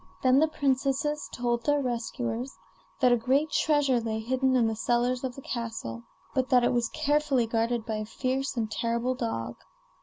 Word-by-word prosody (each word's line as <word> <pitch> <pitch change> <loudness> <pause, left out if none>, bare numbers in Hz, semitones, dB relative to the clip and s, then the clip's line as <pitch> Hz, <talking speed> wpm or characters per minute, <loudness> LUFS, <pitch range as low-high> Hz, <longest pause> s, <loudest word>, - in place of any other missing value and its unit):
Then 260 +1 +5
the 315 - +4
princesses 280 0 0
told 240 -1 -1
their 290 +3 +2
rescuers 240 0 -3 0.4
that 250 -1 +5
a - - +6
great 270 +6 +1
treasure 290 -5 +2
lay 225 -1 -2
hidden 260 +3 +1
in 245 -2 +4
the 225 0 0
cellars 245 +3 0
of 255 -2 -3
the 275 - -10
castle, 225 - -4 0.3
but 260 -1 0
that 250 -1 +5
it 240 - +2
was 235 -1 +1
carefully 290 -4 +1
guarded 230 0 0
by 220 -1 -2
a 215 - -3
fierce 260 +4 -2
and 220 -2 -1
terrible 235 +2 0
dog. 120 - -3
245 Hz, 180 wpm, -28 LUFS, 230-265 Hz, 0.4 s, a